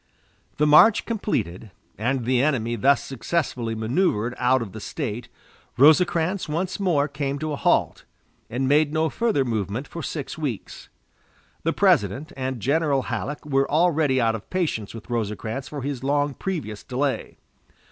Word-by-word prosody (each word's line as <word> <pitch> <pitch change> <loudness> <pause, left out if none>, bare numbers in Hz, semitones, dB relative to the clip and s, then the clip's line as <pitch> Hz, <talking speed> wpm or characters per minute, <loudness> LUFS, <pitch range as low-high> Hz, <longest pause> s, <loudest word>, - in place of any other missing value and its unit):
The 150 - +3
march 155 +9 +6
completed, 115 - -2 0.3
and 120 +3 -1
the 125 0 +2
enemy 120 -5 +1
thus 135 +5 +3
successfully 125 -3 -2
manoeuvered 115 - 0
out 125 0 +3
of 100 - -9
the 110 - -8
State, 120 -1 -5 0.5
Rosecrans 165 +5 +4
once 180 +5 -2
more 165 -7 +2
came 140 -1 -3
to 155 +1 -3
a - - -1
halt, - - +1 0.5
and 130 +3 -1
made 145 +2 +3
no 160 +1 +1
further 225 - +1
movement 110 +2 -2
for 170 - -7
six 150 0 -5
weeks. 135 -9 -5 0.7
The - - +1
President 105 +10 +2
and 130 -2 -3
General 140 +1 +1
Halleck 135 +6 -4
were 135 -2 +1
already 155 -4 +3
out 115 -2 +2
of 110 -2 -7
patience 155 - -2
with 115 - -10
Rosecrans 115 +3 -3
for 145 -3 -6
his 135 -2 -4
long 145 +1 +1
previous 130 - -4
delay. 135 +1 -2
135 Hz, 150 wpm, -24 LUFS, 115-155 Hz, 0.7 s, march